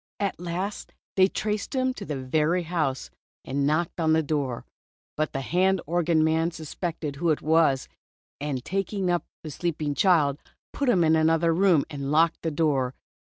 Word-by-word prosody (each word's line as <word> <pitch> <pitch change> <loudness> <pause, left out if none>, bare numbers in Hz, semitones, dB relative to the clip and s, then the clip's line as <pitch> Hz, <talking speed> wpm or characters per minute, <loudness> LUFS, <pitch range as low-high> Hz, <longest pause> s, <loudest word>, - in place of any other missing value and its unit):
At 200 -4 -2
last 180 +4 -4 0.2
they 185 -1 +6
traced 210 +5 -3
him 260 0 +1
to 205 - -8
the 145 -5 -4
very 155 +7 +1
house, 155 -6 -2 0.3
and 140 +1 0
knocked 160 +4 0
at 160 - +1
the 160 0 +3
door. 140 -5 -2 0.5
But 155 0 -1
the 135 - -3
hand 185 +6 +2
organ 165 -1 +2
man 160 +1 +2
suspected 160 -2 -5
who 170 +3 0
it 155 - 0
was, 155 -4 +3 0.5
and 140 -3 -3
taking 195 +1 -1
up 175 - 0 0.2
the 155 - -6
sleeping 150 -1 -2
child, 150 -5 +3 0.3
put 280 -3 0
him 185 -8 +4
in 160 0 +4
another 165 +1 +3
room 175 -4 +3
and 140 -2 -5
locked 165 +2 +3
the 165 - -1
door. 145 -5 0
160 Hz, 170 wpm, -26 LUFS, 150-175 Hz, 0.5 s, they